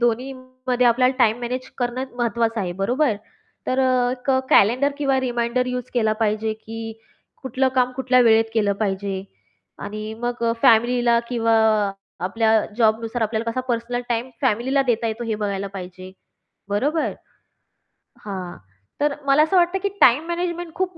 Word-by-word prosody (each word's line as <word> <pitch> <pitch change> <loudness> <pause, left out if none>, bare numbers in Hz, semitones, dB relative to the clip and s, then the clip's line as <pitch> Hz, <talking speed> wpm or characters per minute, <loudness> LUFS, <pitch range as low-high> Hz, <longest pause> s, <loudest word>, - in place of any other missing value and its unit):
दोन्हीमध्ये 255 +1 -1
आपल्याला 255 +2 +3
time 235 -2 +3
manage 255 +2 -4
करणं 245 +1 -2
महत्त्वाचं 230 -1 0
आहे. 180 -2 -2
बरोबर? 250 +1 +1 0.5
तर 255 - 0
अ, 255 -1 +2
एक 250 +1 -3 0.2
कॅलेंडर 250 +8 +4
किंवा 275 -2 +1
रिमाइंडर 245 0 -1
यूज 250 -1 -4
केला 220 -3 +2
पाहिजे, 215 0 0
की 225 +1 -7 0.5
कुठलं 260 +1 0
काम 255 -1 +2
कुठल्या 255 -1 +3
वेळेत 225 -1 +5
केलं 205 -2 +2
पाहिजे 195 -2 -2 0.6
आणि 215 +1 -5
मग 240 0 -3 0.2
फॅमिलीला 235 +1 +4
किंवा 230 -2 +1 0.7
आपल्या 220 +4 +1 0.3
जॉबनुसार 225 +1 +1
आपल्याला 220 +1 -1
कसा 255 - -2
पर्सनल 240 +1 -1
टाईम 240 +1 -1
फॅमिलीला 260 +6 +1
देता 230 -1 +1
येतो, 225 +2 -3
हे 225 -2 -1
बघायला 200 -2 -3
पाहिजे. 185 0 -8 0.6
बरोबर. 290 +11 0 1.1
हां, 185 -4 -6 0.4
तर 295 -1 +2
मला 280 +2 +5
असं 320 +5 0
वाटतं, 350 +2 +3
की 400 - +1
टाईम 260 +6 +6
मॅनेजमेंट 345 -1 -3
खूप 370 -2 -2
240 Hz, 145 wpm, -22 LUFS, 220-255 Hz, 1.1 s, टाईम